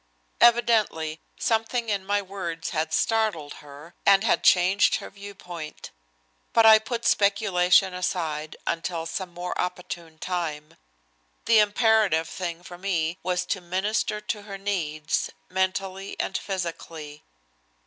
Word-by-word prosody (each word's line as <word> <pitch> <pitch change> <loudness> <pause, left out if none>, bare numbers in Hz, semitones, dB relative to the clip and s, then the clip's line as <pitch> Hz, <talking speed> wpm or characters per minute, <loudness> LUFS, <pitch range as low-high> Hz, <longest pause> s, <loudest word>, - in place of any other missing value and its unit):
Evidently 220 -10 +3 0.2
something 230 +1 0
in 200 -2 0
my 205 +1 0
words 175 -4 -5
had 160 -1 -1
startled 215 -9 0
her 145 +3 -13
and 195 0 +5
had 220 - +2
changed 185 +3 +4
her - - -6
viewpoint. 190 -6 -9 0.6
But 230 - +5
I 220 -1 +9
put 235 +2 -4
speculation 195 -2 +3
aside 160 -4 -3
until 165 0 -2
some 180 +2 -4
more 175 +1 -5
opportune 175 -2 -5
time. 160 -4 -4 0.7
The 225 -1 +6
imperative 210 -5 +3
thing 170 0 -5
for 175 0 -10
me 175 -3 -1
was 180 0 -1
to 190 - -2
minister 205 +4 -1
to 210 0 -4
her 200 -1 -8
needs, 160 -6 -2 0.2
mentally 190 +1 -2
and - - -2
physically. 165 -5 -5
185 Hz, 125 wpm, -25 LUFS, 165-205 Hz, 0.7 s, I